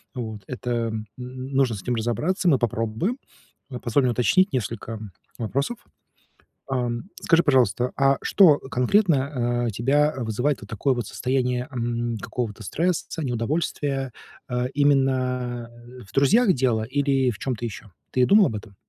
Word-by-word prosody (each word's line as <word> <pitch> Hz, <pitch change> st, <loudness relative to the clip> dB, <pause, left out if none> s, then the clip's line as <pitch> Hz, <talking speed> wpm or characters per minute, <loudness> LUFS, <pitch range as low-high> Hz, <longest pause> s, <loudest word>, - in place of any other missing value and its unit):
Вот, 110 Hz, -4 st, -5 dB
это, 125 Hz, -1 st, -4 dB, 0.2 s
м, 110 Hz, -1 st, -4 dB
нужно 130 Hz, 0 st, -1 dB
с 100 Hz, -, -7 dB
этим 125 Hz, -, -1 dB
разобраться. 120 Hz, -, -1 dB
Мы 135 Hz, -, +4 dB
попробуем, 115 Hz, -, -1 dB, 0.5 s
а 125 Hz, -3 st, -6 dB
позволь 120 Hz, +4 st, +1 dB
мне 125 Hz, -, +2 dB
уточнить 155 Hz, -, +3 dB
несколько 115 Hz, -2 st, -3 dB, 0.4 s
вопросов. 140 Hz, -, -2 dB, 0.9 s
Ам, 120 Hz, -3 st, -1 dB, 0.2 s
скажи, 170 Hz, 0 st, +4 dB
пожалуйста, 125 Hz, -, +2 dB
а 135 Hz, 0 st, +3 dB
что 170 Hz, -8 st, +5 dB
конкретно, 130 Hz, -, +1 dB
а, -, -, -1 dB
тебя 145 Hz, +8 st, +2 dB
вызывает 125 Hz, +4 st, -1 dB
вот -, -, -11 dB
такое 125 Hz, +5 st, +1 dB
вот 120 Hz, -4 st, -3 dB
состояние, 125 Hz, 0 st, -1 dB
м, 120 Hz, -2 st, -2 dB
какого-то 110 Hz, 0 st, -4 dB
стресса, 165 Hz, -, -1 dB
неудовольствия, 135 Hz, +1 st, -1 dB, 0.4 s
а, 125 Hz, 0 st, 0 dB
именно 130 Hz, -4 st, +1 dB, 0.4 s
в -, -, -16 dB
друзьях 195 Hz, -, +4 dB
дело 120 Hz, -4 st, +1 dB
или 135 Hz, +1 st, +1 dB
в 105 Hz, -, -9 dB
чём-то 125 Hz, -3 st, -3 dB
ещё? 105 Hz, -2 st, -8 dB, 0.2 s
Ты 125 Hz, -1 st, +3 dB
думал 200 Hz, +5 st, +6 dB
об 110 Hz, -, -4 dB
этом? 105 Hz, -1 st, -9 dB
125 Hz, 145 wpm, -24 LUFS, 115-140 Hz, 0.9 s, думал